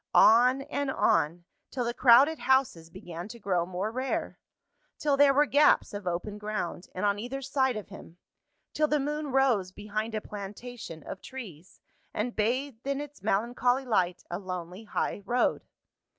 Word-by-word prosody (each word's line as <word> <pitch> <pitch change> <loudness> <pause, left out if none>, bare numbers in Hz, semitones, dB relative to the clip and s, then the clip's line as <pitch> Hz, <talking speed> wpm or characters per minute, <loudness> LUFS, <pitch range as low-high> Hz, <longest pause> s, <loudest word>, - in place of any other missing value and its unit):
On 250 +4 +6
and 285 0 -3
on, 165 - +1 0.3
till 250 -2 -3
the 240 - -1
crowded 270 +6 +6
houses 255 -12 +1
began 175 -1 -8
to 235 - -10
grow 180 -4 0
more 185 +4 -3
rare 260 +3 -3 0.6
till 290 -2 +1
there 280 0 +6
were 290 +2 +4
gaps 290 -5 +4
of 205 -2 -6
open 180 +4 -3
ground, 210 -4 -4
on 200 +2 0
either 260 +5 -5
side 265 -3 +1
of 210 - -8
him 165 - -12 0.6
till 305 0 +2
the 300 0 +1
moon 300 +2 -2
rose 255 -9 +2
behind 215 +3 -4
a - - 0
plantation 205 - -8
of 190 - -8
trees, 190 - -10 0.3
and 235 +3 -2
bathed 250 +3 -1
in 280 0 0
its 290 -6 -8
melancholy 245 +6 +1
light 180 -7 0
a 175 - -2
lonely 185 +1 -6
high 205 - -2
road. 240 +5 0
225 Hz, 160 wpm, -28 LUFS, 190-265 Hz, 0.6 s, On